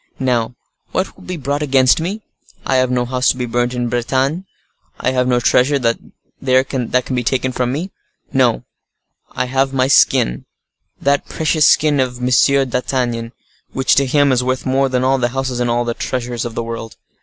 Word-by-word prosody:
Now, 120 -3 -1 0.4
what 185 - -2
will - - -16
be 180 -1 -5
brought 145 0 -2
against 135 0 +3
me? 200 +6 -4 0.4
I 130 - +1
have 130 0 +2
no 125 -1 0
house 125 +1 +1
to - - +1
be 125 - -2
burnt 120 +1 -1
in 120 0 -1
Bretagne; 130 +8 -1 0.5
I 130 - 0
have 125 -1 +1
no 125 -1 +2
treasure 130 +4 +3
there 115 -3 +1 0.5
that 130 0 +2 0.4
can 130 - -3
be 125 - -1
taken 130 +2 0
from 125 -1 -1
me.—No; 165 +8 -2 0.8
but - - -24
I 125 - +1
have 135 +1 0
my 130 -1 +2
skin; 60 - +3 0.5
that 140 +1 +1
precious 155 -1 +2
skin 150 -2 +3
of 125 -1 -1
M. 125 +1 -2 0.4
d'Artagnan, 120 -2 -2 0.4
which 130 0 +2
to 140 0 +3
him 145 +1 +3
is 125 -1 +2
worth 130 0 -2
more 135 +1 +1
than 125 0 0
all 135 +1 +2
the 120 - +1
houses 130 -1 -3
and 120 -1 0
all 120 +1 0
the 120 - -1
treasures 120 -1 -3
of 115 -1 -6
the 115 - -2
world. 115 -1 -7
130 Hz, 190 wpm, -17 LUFS, 120-135 Hz, 0.8 s, against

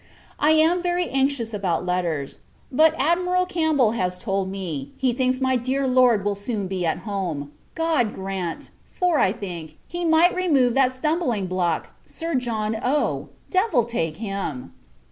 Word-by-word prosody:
I 305 +2 +4
am 325 +3 +4
very 355 0 0
anxious 265 -4 0
about 180 -4 -1
letters; 170 -6 -2 0.3
but 315 +4 +4
Admiral 360 +5 +2
Campbell 315 - +2
has 180 -5 -1
told 195 -1 -2
me, 170 -8 -5
he 255 -2 +1
thinks 255 0 +1
my 260 -1 +2
dear 260 +3 0
Lord 250 -5 +4
will 205 - +1
soon 200 0 -3
be 185 -1 -3
at 160 - -1
home. 175 -9 -3 0.2
God 315 -10 +1
grant! 190 -3 -4 0.2
for, 355 -4 +1
I 185 - +4
think, 170 -7 -7
he 345 0 -4
might 330 +2 +5
remove 290 -10 +2
that 265 -1 +3
stumbling 255 - -1
block, 180 -3 -1
Sir 330 0 -5
John 225 -4 -1
O! 280 +4 0 0.2
Devil 370 - +3
take 165 -9 -2
him! 195 - -4
240 Hz, 155 wpm, -23 LUFS, 190-310 Hz, 0.3 s, might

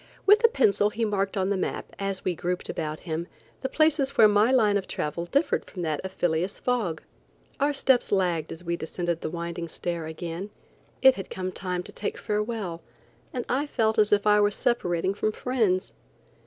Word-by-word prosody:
With 420 +3 +6
a - - +9
pencil 210 - +3
he 225 +2 -1
marked 200 -2 -1
on 190 0 +1
the - - +2
map, 185 - -4
as 195 -1 -2
we 185 - +1
grouped 180 +2 -3
about 155 -1 -3
him, 165 0 -4 0.3
the 265 - -2
places 295 -2 +2
where 215 - +8
my 210 +2 +4
line 220 -6 +4
of 195 -2 -1
travel 155 +3 -3
differed 280 - +1
from 180 -3 -7
that 155 -3 -1
of 190 - -5
Phileas 175 +3 0
Fogg. 220 -11 -1 0.6
Our 285 +1 +3
steps 265 -3 +2
lagged 180 -5 +1
as 165 +1 -7
we 170 0 -1
descended 170 +1 -3
the - - -3
winding 170 0 -4
stair 170 0 -4
again. 170 +4 -5 0.5
It 265 0 +9
had 195 -6 -7
come 185 0 -4
time 180 -1 -3
to - - -9
take 210 - -4
farewell, 210 -5 -3 0.5
and 245 - -3
I 280 +4 0
felt 220 -5 +1
as 210 -1 +4
if 205 0 +3
I 210 0 +5
was 205 0 +2
separating 185 -6 0
from 215 +1 -1
friends. 215 -8 0
195 Hz, 195 wpm, -26 LUFS, 175-225 Hz, 0.6 s, a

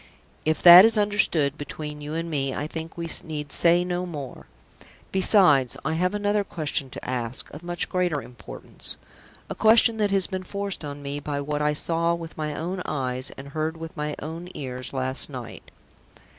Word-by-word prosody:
If 155 0 0
that 175 +1 +12
is 225 0 +4
understood 185 -8 +1
between 150 +1 -7
you 150 +2 -5
and 165 +1 -3
me, 135 -4 -2
I 145 - -3
think 160 +2 -7
we 170 0 -4 0.2
need 150 -3 -6
say 175 +1 +4
no 180 0 -2
more. 145 -6 -8 0.6
Besides, 180 - +4
I 160 - 0
have 180 +4 0
another 205 0 +1
question 155 -6 -2
to - - -9
ask, 125 -1 -4
of 150 - -9
much 175 0 -3
greater 180 -5 0
importance 120 -5 -5 0.5
a - - -4
question 225 +1 +4
that 210 -2 +1
has 195 -2 +3
been 190 -1 -4
forced 200 -1 -5
on 145 -1 -7
me 140 +1 -4
by 145 0 -4
what 150 +1 -3
I 150 0 +2
saw 170 +2 +2
with 165 -1 -9
my 150 -1 -4
own 180 +3 -4
eyes, 130 -3 -2
and 140 +1 -9
heard 155 +2 -3
with 165 +2 -8
my 150 -1 -3
own 165 +3 -7
ears, 130 -2 -5
last 130 +1 +1
night." 125 -5 -9
155 Hz, 185 wpm, -25 LUFS, 145-180 Hz, 0.6 s, that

